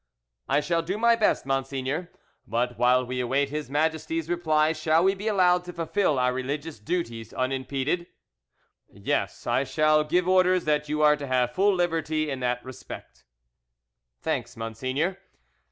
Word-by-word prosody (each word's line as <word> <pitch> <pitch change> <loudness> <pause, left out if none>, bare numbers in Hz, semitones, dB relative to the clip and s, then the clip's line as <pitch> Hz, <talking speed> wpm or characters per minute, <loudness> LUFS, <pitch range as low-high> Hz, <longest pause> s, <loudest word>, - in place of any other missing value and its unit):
"I 145 - +3
shall 165 +2 0
do 180 +5 -3
my 235 +1 +4
best, 220 - +1
monseigneur; 135 +4 -2 0.4
but 120 +2 -1
while 125 +1 +4
we 125 +1 -4
await 135 +3 +1
His 150 -3 -4
Majesty's 160 +2 -1
reply 155 -2 +2
shall 155 +1 +2
we 190 +1 +4
be 200 +2 -6
allowed 180 -4 +3
to 180 - -7
fulfil 170 -2 0
our 125 0 +2
religious 140 +2 -4
duties 115 -4 -4
unimpeded?" 135 +6 -1 0.8
"Yes, - - -2
I - - +2
shall 155 +3 +3
give 175 +4 +1
orders 185 -1 +3
that 150 -1 0
you 150 0 0
are 150 0 +6
to 145 -1 -6
have 125 -1 +1
full 195 +1 +3
liberty 160 -3 0
in 135 - -3
that 125 0 -1
respect." 120 - -10 0.9
"Thanks, - - -3
monseigneur." 130 - -2
150 Hz, 155 wpm, -26 LUFS, 130-175 Hz, 0.9 s, are